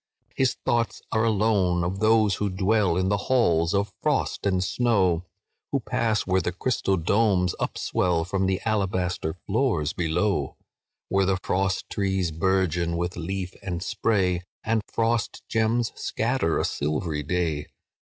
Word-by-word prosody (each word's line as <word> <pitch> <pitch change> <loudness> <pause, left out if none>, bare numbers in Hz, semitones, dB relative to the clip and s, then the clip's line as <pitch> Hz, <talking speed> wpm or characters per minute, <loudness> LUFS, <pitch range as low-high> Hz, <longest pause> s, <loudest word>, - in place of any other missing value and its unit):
"His 130 -2 +2
thoughts 115 -1 0
are 110 - +2
alone 100 -5 +2
of 95 +3 -2
those 110 -2 +3
who 105 - -1
dwell 95 -1 +2
In 95 0 +1
the 100 - +2
halls 85 -10 +3
of 100 0 0
frost - - 0
and 95 -2 +1
snow, 95 -5 +1 0.4
Who 140 - +1
pass 110 -2 0
where 95 0 +2
the 90 - -1
crystal 95 -1 0
domes 90 0 +2
upswell 85 -3 0
From 95 +1 0
the 95 0 0
alabaster 95 -6 -1
floors 105 - 0
below, 85 -2 0 0.5
Where 95 -1 +2
the 95 -1 +2
frost 95 +1 -1
trees 95 -4 0
bourgeon 85 0 +1
with 85 +1 -2
leaf 95 +2 -4
and 90 -3 -4
spray, 95 -4 +1 0.2
And 110 0 +1
frost 115 -1 0
gems 115 +1 +1
scatter 115 -8 0
a - - +1
silvery 75 +1 -2
day. 80 -1 -1
95 Hz, 140 wpm, -25 LUFS, 90-110 Hz, 0.5 s, those